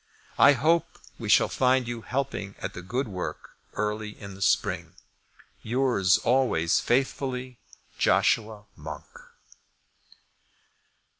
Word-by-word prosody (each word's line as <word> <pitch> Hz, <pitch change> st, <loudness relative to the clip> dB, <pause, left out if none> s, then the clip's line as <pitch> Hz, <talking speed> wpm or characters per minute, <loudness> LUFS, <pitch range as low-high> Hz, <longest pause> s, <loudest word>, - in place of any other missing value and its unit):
I 145 Hz, -, +8 dB
hope 160 Hz, +6 st, +1 dB, 0.2 s
we -, -, -5 dB
shall -, -, +5 dB
find 130 Hz, -1 st, +2 dB
you 120 Hz, -1 st, -4 dB
helping 125 Hz, -6 st, -3 dB
at 95 Hz, -, -5 dB
the 90 Hz, -, -7 dB
good 125 Hz, +9 st, -2 dB
work 90 Hz, -4 st, -6 dB, 0.2 s
early 105 Hz, 0 st, -3 dB
in 100 Hz, -2 st, -9 dB
the 95 Hz, -, -12 dB
spring. -, -, 0 dB, 0.7 s
Yours, 120 Hz, -6 st, +2 dB
always 120 Hz, -10 st, +2 dB
faithfully, 130 Hz, -1 st, -1 dB, 0.4 s
JOSHUA 110 Hz, -2 st, +2 dB
MONK. 75 Hz, -1 st, -8 dB
115 Hz, 105 wpm, -26 LUFS, 100-130 Hz, 0.7 s, I